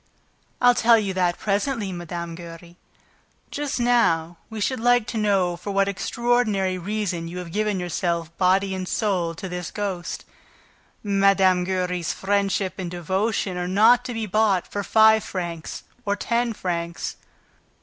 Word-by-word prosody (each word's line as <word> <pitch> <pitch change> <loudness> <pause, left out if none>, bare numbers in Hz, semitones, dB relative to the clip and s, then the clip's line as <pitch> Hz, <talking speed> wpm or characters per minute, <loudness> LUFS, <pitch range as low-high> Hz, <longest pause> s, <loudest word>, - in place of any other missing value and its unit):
"I'll 245 0 +6
tell 230 -1 +5
you 200 -3 -1
that 180 -2 +1
presently, 205 0 -1
Mme. 170 -1 -5
Giry. 170 0 -11 0.8
Just 290 -2 -3
now 175 -9 +2
we 220 -1 -6
should 255 +5 -1
like 245 0 +3
to - - -3
know 195 -4 +2
for 180 +4 -8
what 195 0 +2
extraordinary 215 -2 0
reason 185 -3 -3
you 175 +2 -7
have 180 -2 -6
given 210 0 0
yourself 170 -2 -2
body 190 +1 +3
and 185 -1 -4
soul, 180 -7 0
to 190 +3 -6
this 180 -1 -5
ghost... 190 -4 -4 0.8
Mme. 195 -2 +3
Giry's 180 -2 -1
friendship 195 -1 -1
and 180 -2 -3
devotion 190 +3 -1
are 180 0 -2
not 225 +6 +5
to 245 - -4
be 225 -1 -2
bought 210 -2 +2
for 205 - -4
five 220 +1 +5
francs 170 -3 -5 0.2
or 200 -3 0
ten 235 +2 0
francs." 170 -4 -4
195 Hz, 150 wpm, -23 LUFS, 175-215 Hz, 0.8 s, I'll